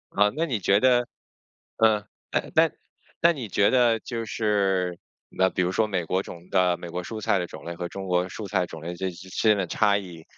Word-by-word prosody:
呃， 105 +1 +5
那 160 +2 0
你 125 -9 -2
觉 100 +1 +3
得， 125 0 +3 0.7
呃， 110 -2 +3 0.3
诶， - - -1
那 - - +5 0.5
那 170 - +5
你 130 -8 -6
觉 100 +1 +3
得 120 -3 +4
就 115 -2 -4
是， 95 -5 0 0.3
那 95 0 +2
比 90 +1 0
如 90 - 0
说 110 +3 +1
美 95 -5 -2
国 95 +4 0
种 85 -2 -11
的 90 -2 +3
美 85 - -8
国 90 +1 -4
蔬 110 +4 -6
菜 105 - +1
的 90 - -3
种 - - -11
类 85 - -4
和 85 0 -5
中 95 +1 -6
国 90 0 +1
蔬 105 +2 -6
菜 95 -2 +1
种 80 - -9
类 85 +2 -4
这 95 +2 -2
这 95 +1 -11
之 - - -2
间 105 - +5
的 95 - 0
差 100 +3 +2
异， 90 -5 -8
95 Hz, 250 characters per minute, -25 LUFS, 90-110 Hz, 0.7 s, 呃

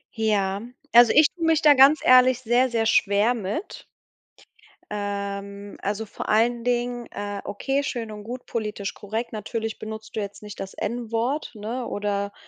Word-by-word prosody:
Ja, 205 -3 0 0.3
also, 240 -1 +7
ich 305 0 +6
tue 345 - -7
mich 325 -1 +3
da 300 -1 +8
ganz 275 +3 +6
ehrlich 255 0 +6
sehr, 245 +2 +2
sehr 230 -2 0
schwer 210 +1 +3
mit. 220 - -5 1.0
Ähm, 200 0 -5
also, 205 +2 -2
vor 205 - -7
allen 230 +2 +2
Dingen 245 0 -1
äh, 205 -1 -5
okay, 270 +7 -1
schön 235 -6 -4
und 210 -1 -8
gut, 245 +3 -7
politisch 210 -3 -4
korrekt. 220 +4 -5
Natürlich 220 +1 -4
benutzt 220 0 -8
du - - -1
jetzt 205 0 -6
nicht 210 -2 -9
das 195 0 -6
N-Wort, 235 +5 -2
ne, 230 +4 -4
oder, 200 0 -2
220 Hz, 160 wpm, -24 LUFS, 205-245 Hz, 1.0 s, da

